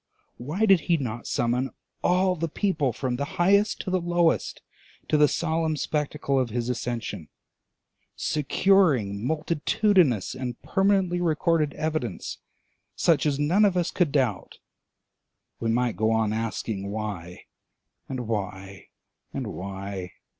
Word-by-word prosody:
Why 155 - -1
did 195 -4 +6
he 170 - +5
not 120 -5 -4
summon 125 +3 0 0.3
all 185 +1 +3
the 165 -1 -2
people 155 -7 0
from 125 +1 -3
the 140 +2 -5
highest 200 +4 +3
to 185 - -4
the 185 -1 +1
lowest 175 -1 +1 0.5
to - - +3
the 150 0 +6
solemn 160 0 0
spectacle 150 -2 -1
of 125 -2 0
his 120 +2 -2
ascension, 115 -8 -4 0.9
securing 145 - +2
multitudinous 160 - +2
and 125 -2 -5
permanently 195 -3 +2
recorded 160 -2 +1
evidence 155 - -3 0.6
such 160 - +3
as 140 -2 +1
none 165 +9 +3
of 195 -3 +3
us 175 - 0
could 175 -6 +1
doubt? 130 -9 -1 1.0
We 115 - -1
might 120 0 +1
go 110 +1 +2
on 110 -1 +1
asking 110 -3 -3
Why? 100 -5 -5 0.7
and 130 -2 -3
Why? 100 -4 -5 0.4
and - - -4
Why? 95 -1 -6
140 Hz, 130 wpm, -26 LUFS, 110-170 Hz, 1.0 s, did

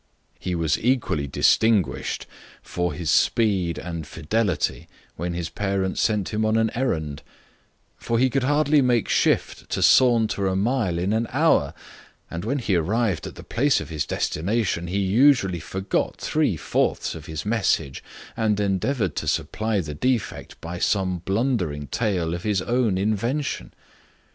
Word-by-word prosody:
He 90 -1 -3
was 80 -3 0
equally 115 - +1
distinguished 105 +7 +2 0.4
for 90 0 -2
his 85 -3 -2
speed 95 -8 +2
and 85 -3 -6
fidelity 90 +3 -1 0.3
when 85 +1 -3
his 85 -1 -3
parents 95 0 -1
sent 105 -4 +1
him 110 0 -1
on 110 +1 +2
an 110 0 +2
errand; 80 - -2 0.8
for 115 - -1
he 130 +3 +4
could 135 +2 0
hardly 145 +2 +3
make 120 -4 +2
shift - - +1
to - - -1
saunter 115 -6 +4
a 95 - 0
mile 105 -3 0
in 90 +4 0
an 115 +1 0
hour, - - +2 0.6
and 85 +1 -4
when 130 +7 -1
he 110 -7 0
arrived 100 +3 0
at - - -9
the - - -10
place 140 +4 +1
of - - -7
his 80 -3 -3
destination, 90 0 -1
he 95 +3 -2
usually 100 -2 +3
forgot 95 +4 -2
three - - 0
fourths - - 0
of 80 0 -10
his 80 0 -5
message, 100 -11 0 0.3
and 110 -2 +1
endeavoured 105 +5 0
to - - -3
supply 105 +7 0
the 75 -3 -6
defect 120 - -2
by 85 +1 -6
some 95 -3 0
blundering 95 - -1
tale 90 - -1
of 85 - -4
his 100 -1 0
own 115 -2 +1
invention. 115 +8 -1
100 Hz, 155 wpm, -24 LUFS, 85-115 Hz, 0.8 s, he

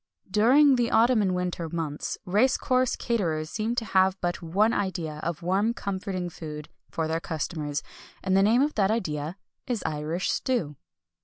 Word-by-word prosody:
During 260 +7 +5
the 240 -1 +1
autumn 230 +1 +4
and 185 -2 +1
winter 180 -2 -2
months, 155 -3 -3
race 215 +8 +3
course 255 -1 +1
caterers 165 -10 -1
seem 225 +2 -1
to 230 - -1
have 190 -1 +2
but 175 0 -2
one 195 +7 +2
idea 170 -6 -2
of 170 0 -4
warm 200 +6 +1
comforting 190 -3 -3
food 150 -3 -8 0.2
for 160 -1 -2
their 160 +1 -1
customers, 155 -2 -3 0.4
and 190 -1 +1
the 195 - +5
name 225 +6 +4
of 300 +1 0
that 195 -2 +2
idea 165 -6 -2 0.3
is 245 -4 -2
Irish 155 +4 -1
stew. 185 - -1
185 Hz, 165 wpm, -27 LUFS, 160-225 Hz, 0.4 s, During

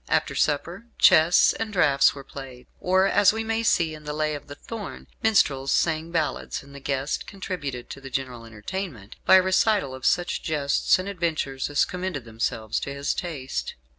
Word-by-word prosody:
After - - +1
supper, 170 +9 -1
chess 160 +3 +6
and 225 -1 -4
draughts 145 -9 +4
were 140 - -9
played, 130 -2 -10
or 185 +1 +3
(as 200 0 +5
we 225 0 -2
may 225 0 -1
see 170 -8 +2
in 155 0 -10
"The 150 0 -4
Lay 155 0 0
of 145 - -7
the 145 - -8
Thorn") 225 +3 -8 0.2
minstrels 145 - +2
sang 160 0 +1
ballads 160 -5 -2
and 140 0 -15
the 140 - -9
guest 135 +1 -2
contributed 160 - -5
to 140 - -8
the 135 - -8
general 130 -3 -4
entertainment 115 - -7
by - - +8
the 185 - +7
recital 190 -5 +2
of 130 0 -2
such 175 0 +1
jests 145 -3 +2
and 185 +1 -5
adventures 160 -8 -2
as 145 - +2
commended 180 -8 -4
themselves 110 -1 -2
to 140 - -5
his 140 0 -2
taste. 150 -7 -4
155 Hz, 185 wpm, -25 LUFS, 135-185 Hz, 0.2 s, by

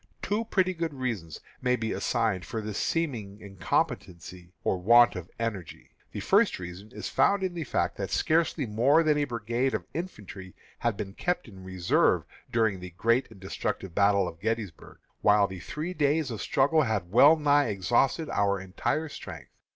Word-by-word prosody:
Two 215 +3 -1
pretty 185 -4 +1
good 165 -3 -3
reasons 110 - -4 0.2
may 125 0 +2
be 110 -2 -3
assigned 110 -7 0
for 115 - -5
this 105 -1 -4
seeming 115 -12 -2
incompetency 90 - -3
or 95 - 0
want 120 +5 +6
of 90 -1 -7
energy. 105 -7 -5 0.2
The - - -5
first - - +3
reason 90 +4 -9
is - - -6
found 200 -1 +2
in 185 -1 -1
the 170 -2 -4
fact - - -1
that - - -3
scarcely 160 -3 +1
more 125 +9 +3
than 150 -2 +2
a 145 - +1
brigade 120 +1 -1
of - - -4
infantry 105 - -7 0.2
had 120 -4 -1
been 100 -2 -5
kept 180 - -2
in 95 -4 -12
reserve 95 -2 +2 0.3
during 110 -5 +1
the 90 0 -8
great 115 +6 +2
and 110 -4 -15
destructive 95 -1 -4
battle 100 0 +3
of 80 - -8
Gettysburg, 110 -4 -4 0.2
while 105 -1 +5
the 95 -2 -7
three 155 - -5
days 150 -2 +1
of 110 - -5
struggle 150 +2 +2
had 105 - -1
well 140 +8 +7
nigh 145 -2 +3
exhausted 120 - +1
our 100 -1 +1
entire 95 +12 -2
strength. - - -10
115 Hz, 175 wpm, -28 LUFS, 95-145 Hz, 0.3 s, well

